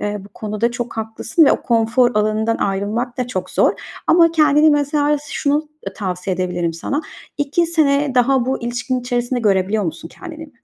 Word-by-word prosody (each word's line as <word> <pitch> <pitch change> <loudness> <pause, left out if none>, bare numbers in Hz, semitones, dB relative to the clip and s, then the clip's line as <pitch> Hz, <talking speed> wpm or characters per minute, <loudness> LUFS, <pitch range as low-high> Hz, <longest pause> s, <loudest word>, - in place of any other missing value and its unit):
Eee, 210 0 -2
bu - - -13
konuda 215 +3 -2
çok 240 -1 -5
haklısın 225 +8 +1
ve - - +5
o - - -2
konfor 235 +1 +2
alanından 215 +2 +1
ayrılmak 210 +6 -2
da 250 - -1
çok 190 -7 -4
zor. - - +3 0.3
Ama 335 -1 +5
kendini 305 -1 +4
mesela, 290 0 +2
şunu 295 +1 0 0.3
tavsiye 185 -2 -3
edebilirim 175 -2 -2
sana. 275 - -3 0.4
2 295 +4 +1
sene 290 -4 +2
daha 255 0 +3
bu 260 -2 -2
ilişkinin 245 +2 -2
içerisinde 245 0 -2
görebiliyor 200 0 +1
musun 165 0 -5
kendini? 320 - -10
245 Hz, 165 wpm, -19 LUFS, 210-290 Hz, 0.4 s, ve